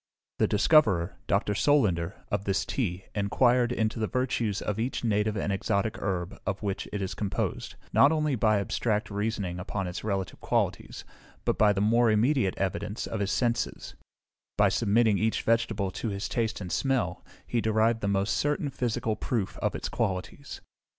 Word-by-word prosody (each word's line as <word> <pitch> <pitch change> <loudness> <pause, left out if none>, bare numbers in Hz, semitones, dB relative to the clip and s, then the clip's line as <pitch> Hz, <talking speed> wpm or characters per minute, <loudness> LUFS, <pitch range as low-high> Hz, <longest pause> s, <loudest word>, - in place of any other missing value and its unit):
The - - +4
discoverer, 105 - +3
Dr. 105 +1 +1
Solander, 100 - +1
of 100 0 -1
this 100 -1 0
tea, 95 -7 -2
inquired 120 +4 +2
into 115 -1 -1
the 110 - 0
virtues 120 -5 -1
of 105 +1 -3
each 125 +3 -2
native 105 -1 +1
and 100 0 -1
exotic 100 +2 -1
herb 90 -2 -3
of 95 +2 -3
which 100 -1 -2
it 100 -1 -2
is 95 - -3
composed, 100 -3 -3 0.2
not 140 - +6
only 155 -2 +1
by 110 -2 +3
abstract 105 +2 -1
reasoning 100 -3 -2
upon 95 +1 -3
its 90 0 -5
relative 100 -3 -3
qualities, - - -1 0.4
but - - 0
by 105 -1 +6
the 100 -1 0
more 115 +3 +4
immediate 110 -1 +2
evidence 100 +2 -2
of 115 - -4
his 100 -1 -1
senses: 120 +3 -1 0.6
by 100 -1 +5
submitting 110 0 +2
each 110 +1 0
vegetable 110 -4 +1
to 115 - -4
his 100 0 -3
taste 115 -3 -1
and 90 -3 -6
smell, 135 -2 0 0.2
he 120 - -1
derived 110 +1 +2
the 100 - -1
most 100 +2 +1
certain 145 -1 0
physical 115 -3 -1
proof 105 -2 -2
of - - -1
its - - -3
qualities. 95 +9 -3
105 Hz, 170 wpm, -28 LUFS, 100-115 Hz, 0.6 s, not